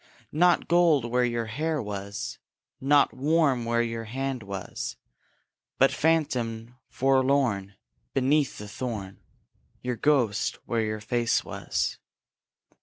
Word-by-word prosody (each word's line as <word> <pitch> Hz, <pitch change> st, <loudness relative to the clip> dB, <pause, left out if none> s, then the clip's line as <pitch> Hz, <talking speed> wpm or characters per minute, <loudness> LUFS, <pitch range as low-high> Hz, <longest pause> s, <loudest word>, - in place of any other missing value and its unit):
Nought 175 Hz, +3 st, +3 dB
gold 170 Hz, -7 st, +4 dB
where 125 Hz, +1 st, +1 dB
your 120 Hz, -1 st, 0 dB
hair 150 Hz, +8 st, -1 dB
was; 100 Hz, -2 st, -5 dB, 0.4 s
Nought 145 Hz, +1 st, +4 dB
warm 140 Hz, -3 st, +2 dB
where 120 Hz, 0 st, +2 dB
your 115 Hz, -1 st, -4 dB
hand 135 Hz, +2 st, -3 dB
was; 100 Hz, -2 st, -5 dB, 0.8 s
But 135 Hz, 0 st, +5 dB
phantom, 125 Hz, -7 st, 0 dB, 0.2 s
forlorn, 130 Hz, -7 st, +1 dB, 0.4 s
Beneath 135 Hz, +2 st, +2 dB
the 105 Hz, -, -7 dB
thorn, 105 Hz, -3 st, -5 dB, 0.6 s
Your 125 Hz, -1 st, -2 dB
ghost 120 Hz, -6 st, +2 dB
where 115 Hz, -1 st, 0 dB
your 110 Hz, -1 st, -2 dB
face 120 Hz, +2 st, +1 dB
was. -, -, -2 dB
125 Hz, 110 wpm, -27 LUFS, 110-140 Hz, 0.8 s, But